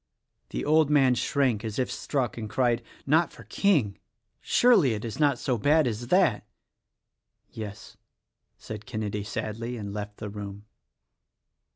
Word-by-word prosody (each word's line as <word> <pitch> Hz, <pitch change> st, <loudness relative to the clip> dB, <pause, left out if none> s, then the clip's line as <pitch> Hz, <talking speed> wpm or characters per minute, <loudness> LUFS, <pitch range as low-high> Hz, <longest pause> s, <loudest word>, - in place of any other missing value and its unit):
The -, -, -4 dB
old 155 Hz, 0 st, +4 dB
man 135 Hz, -4 st, +5 dB
shrank 125 Hz, -4 st, +1 dB
as 110 Hz, -2 st, -4 dB
if 130 Hz, -, 0 dB
struck 130 Hz, -5 st, -2 dB
and 110 Hz, -2 st, -6 dB
cried, 120 Hz, 0 st, +1 dB, 0.2 s
"Not 160 Hz, +4 st, +3 dB
for -, -, -13 dB
King? 145 Hz, -, +1 dB, 0.4 s
surely 190 Hz, -, +4 dB
it 105 Hz, -, -5 dB
is 115 Hz, +4 st, -6 dB
not 145 Hz, -4 st, +3 dB
so 125 Hz, -2 st, -1 dB
bad 150 Hz, +6 st, +4 dB
as 120 Hz, 0 st, -3 dB
that!" 180 Hz, -, +3 dB, 1.1 s
"Yes!" 105 Hz, -1 st, -8 dB, 0.6 s
said 105 Hz, -1 st, -8 dB
Kenedy 105 Hz, -1 st, -3 dB
sadly; 115 Hz, +3 st, -4 dB
and 100 Hz, -2 st, -6 dB
left 105 Hz, 0 st, -6 dB
the 105 Hz, -, -6 dB
room. 100 Hz, 0 st, -8 dB
120 Hz, 145 wpm, -27 LUFS, 105-140 Hz, 1.1 s, man